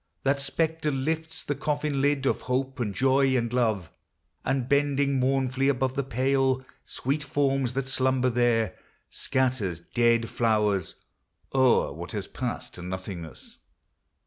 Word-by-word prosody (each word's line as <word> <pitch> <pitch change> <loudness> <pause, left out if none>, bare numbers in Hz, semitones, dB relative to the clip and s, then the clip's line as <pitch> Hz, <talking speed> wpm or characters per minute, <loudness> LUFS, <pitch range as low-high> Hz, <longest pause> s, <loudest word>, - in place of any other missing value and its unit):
That 140 +1 +2
spectre 160 +2 0
lifts 160 +4 -2
The 145 - -1
coffin 145 0 -1
lid 140 -1 +2
of - - +1
Hope 130 +2 -1
and 110 -4 -1
Joy 130 +3 +3
and 115 -1 -1
Love, 110 -8 0 0.5
And 130 -1 0
bending 140 -1 +2
mournfully 130 0 +1
above 130 -1 +1
the 140 - 0
pale, 130 +1 +1 0.2
Sweet 140 +4 -2
forms 135 -3 0
that 135 0 -2
slumber 130 -1 +2
there, 115 -3 +2 0.4
scatters 125 -10 0
dead 115 +5 +2
flowers 105 -7 +1 0.6
O 130 -2 +4
'er - - -8
what - - -7
has - - -3
passed - - -5
to 90 - -9
nothingness. 90 -4 -7
130 Hz, 140 wpm, -27 LUFS, 120-140 Hz, 0.6 s, O